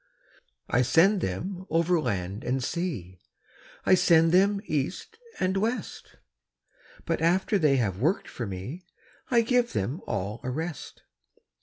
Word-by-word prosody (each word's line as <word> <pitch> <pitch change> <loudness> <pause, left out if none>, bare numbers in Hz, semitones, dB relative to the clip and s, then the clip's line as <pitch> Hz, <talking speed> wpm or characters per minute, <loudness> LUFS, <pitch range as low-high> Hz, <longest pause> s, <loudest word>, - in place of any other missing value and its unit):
I 125 - +2
send 185 - +4
them 180 - -4
over 170 +1 +2
land 95 - -3
and 130 +1 -1
sea, 120 - -4 0.7
I - - +5
send 165 -2 +5
them 200 +3 +4
east 155 - -3 0.2
and 185 +1 +1
west; 225 +5 -3 0.9
But 165 -2 -1
after 190 +5 +2
they 150 -5 +4
have 100 -6 -1
worked 165 +8 +1
for 120 - -5
me, 100 - -6 0.5
I 235 -2 +4
give 240 0 +1
them 125 - -2
all 100 +4 -3
a 125 - -3
rest. 160 +3 -5
165 Hz, 135 wpm, -27 LUFS, 120-190 Hz, 0.9 s, I